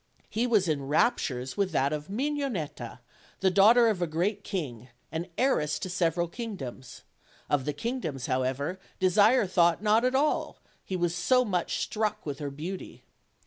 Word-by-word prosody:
He 230 +3 0
was 210 -6 +3
in 140 -4 -1
raptures 135 - +1
with 200 -2 0
that 140 0 +2
of 150 0 -4
Mignonetta, 260 - -3 0.4
the 190 -1 +3
daugh 200 +5 +6
ter 240 -1 +6
of 210 -5 0
a 175 - +1
great 190 +6 -1
king, 130 - -4 0.2
and 165 +3 -4
heiress 150 - +1
to 185 - -5
several 175 -1 +1
kingdoms; 165 - -7 0.5
of 140 -3 +2
the 150 - -1
kingdoms, 160 - -3
however, 130 +7 -1 0.2
Desire 205 +6 +4
thought 175 0 +2
not 215 +2 +4
at 255 +1 +1
all, 295 +3 +1 0.3
he 190 - -4
was 175 -2 0
so 250 +8 +3
much 180 -5 -1
struck 215 -1 -2
with 145 -2 -4
her 145 -2 -3
beauty. 165 +7 -7
180 Hz, 165 wpm, -28 LUFS, 150-215 Hz, 0.5 s, daugh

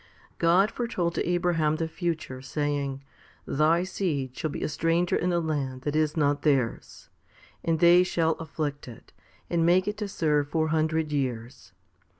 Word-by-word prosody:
* - - -30
God 195 +5 +4
foretold 185 -9 -2
to - - -2
Abraham 175 -4 +1
the 160 +1 -2
future, 160 -6 -4
saying, 140 0 -2 0.4
Thy 155 +4 +2
seed 145 -9 -2
shall 155 - -2
be - - -5
a - - 0
stranger 165 +3 +1
in 180 +1 0
a 175 - +2
land 140 -5 -3
that 145 0 -2
is 155 0 +1
not 145 -1 +2
theirs, 135 -6 -1 0.5
and 165 -1 +1
they 175 +1 +7
shall 165 -3 +1
afflict 150 -3 -4
it, 120 - -13 0.3
and 170 -1 +1
make 180 +3 +3
it 210 0 -2
to 210 -1 -3
serve 150 -6 0
four 160 +1 0
hundred 160 0 0
years. 125 -6 -4
155 Hz, 165 wpm, -27 LUFS, 145-170 Hz, 0.5 s, they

